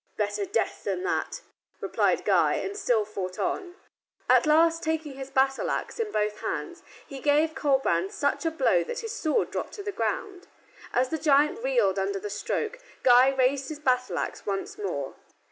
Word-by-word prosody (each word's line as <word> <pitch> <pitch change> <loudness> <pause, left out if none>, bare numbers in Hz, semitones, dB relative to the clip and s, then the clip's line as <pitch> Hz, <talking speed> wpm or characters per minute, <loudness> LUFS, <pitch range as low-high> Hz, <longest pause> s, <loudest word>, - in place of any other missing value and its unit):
"Better 405 - -1
death 405 - -1
than 365 - -2
that," 395 0 -2 0.4
replied - - +1
Guy, - - +3
and 395 - -3
still 240 - +1
fought 185 -3 -5
on. 360 -2 -2 0.5
At - - +5
last, 330 +2 +4
taking 315 -2 -2
his 270 0 -8
battle 270 0 +1
axe - - -3
in 440 -2 -1
both 210 - -1
hands, - - -4 0.2
he 275 - -8
gave 300 +3 +2
Colbrand 265 - +1
such 285 +4 -1
a 325 - +2
blow 260 - +2
that - - -5
his 455 -1 -5
sword 315 -10 0
dropped - - -4
to 405 - -7
the 410 - -3
ground. 395 -2 -3 0.4
As 255 +1 +1
the 320 - -2
giant 300 - +3
reeled 485 - +2
under 195 +1 -1
the 205 +1 -5
stroke, 450 - -3 0.2
Guy 250 +1 +7
raised 265 0 +1
his 310 - -5
battle 255 -3 0
axe - - -3
once 195 -1 -3
more. 155 -9 -4
285 Hz, 180 wpm, -27 LUFS, 245-345 Hz, 0.5 s, Guy